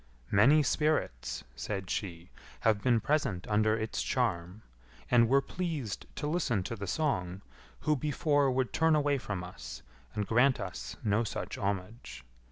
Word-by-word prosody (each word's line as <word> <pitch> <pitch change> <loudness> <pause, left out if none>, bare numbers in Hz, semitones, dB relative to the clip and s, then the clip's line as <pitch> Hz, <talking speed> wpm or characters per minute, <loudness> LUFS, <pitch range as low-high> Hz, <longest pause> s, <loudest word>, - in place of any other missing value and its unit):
"Many 140 +10 +6
spirits," 145 - 0
said 95 - -4
she, 85 -3 -4 0.3
"have 110 -2 +3
been 120 -1 +3
present 140 -12 0
under 110 +1 +2
its 110 0 -2
charm, 90 +5 -1 0.5
and 115 -2 +5
were 140 +1 +4
pleased 155 - -4
to - - -4
listen 150 - 0
to 115 - -4
the 100 -2 -6
song, 95 - -1 0.4
who 155 - +2
before 145 0 +1
would 130 -1 0
turn 160 0 +4
away 145 -2 +2
from 100 -6 -4
us, 65 -9 -9 0.3
and 105 -1 -1
grant 125 +6 +3
us 95 -4 -6
no 105 +2 +2
such 110 - -4
homage. 100 - -4
110 Hz, 150 wpm, -31 LUFS, 95-140 Hz, 0.5 s, Many